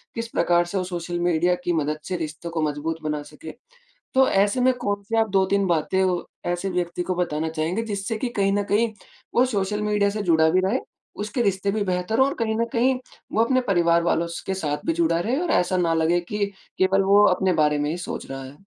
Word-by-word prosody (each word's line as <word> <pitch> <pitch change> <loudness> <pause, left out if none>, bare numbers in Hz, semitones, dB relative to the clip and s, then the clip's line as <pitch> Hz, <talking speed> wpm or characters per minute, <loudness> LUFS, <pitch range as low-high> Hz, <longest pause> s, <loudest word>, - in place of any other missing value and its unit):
किस 230 0 -3
प्रकार 175 -5 +2
से 175 +3 -4
वो 185 - 0
सोशल 175 -1 -4
मीडिया 175 +1 +2
की 175 - +1
मदद 155 -1 -1
से 185 - -2
रिश्तों 160 +1 -5
को 165 -1 -2
मजबूत 155 +2 -2
बना 150 -1 -2
सके। 150 +2 -10 0.6
तो, 265 0 +5
ऐसे 200 +5 +2
में 255 +1 +4
कौन-से 205 0 -2
आप 225 0 +2
2-3 195 +1 +2
बातें, 170 +3 +1
वो 180 -2 0 0.2
ऐसे 175 +2 -1
व्यक्ति 175 -1 -2
को 185 +1 -2
बताना 160 -3 -1
चाहेंगे 160 +7 -1
जिससे 205 0 -3
कि 250 - -2
कहीं 195 0 +3
न 205 0 +1
कहीं 220 +3 +1 0.4
वो 245 - +5
सोशल 210 -3 -1
मीडिया 210 -1 +2
से 210 +1 -3
जुड़ा 160 -4 +4
भी 185 +3 +3
रहे, 225 +7 +1 0.4
उसके 210 +4 -2
रिश्ते 200 -2 0
भी 215 0 0
बेहतर 185 +4 -1
हों 265 - +6
और - - -3
कहीं 220 -1 0
न 230 - +1
कहीं 250 +2 +2 0.3
वो 220 - +3
अपने 255 +2 +2
परिवार 170 -2 +3
वालों 170 0 +1
स 170 - -6
के 190 - -1
साथ 150 -6 -2
भी 330 - +2
जुड़ा 325 - +2
रहे 235 +9 0
और 355 - -2
ऐसा 180 +1 +2
ना 170 -2 +2
लगे 165 +2 +2
कि 205 +4 -2 0.3
केवल 190 +1 +3
वो 200 +1 +6
अपने 185 0 +2
बारे 150 0 +2
में 145 0 -1
ही 165 - -2
सोच 175 - -5
रहा 135 0 -5
है। 140 +8 -13
185 Hz, 230 wpm, -24 LUFS, 170-210 Hz, 0.6 s, हों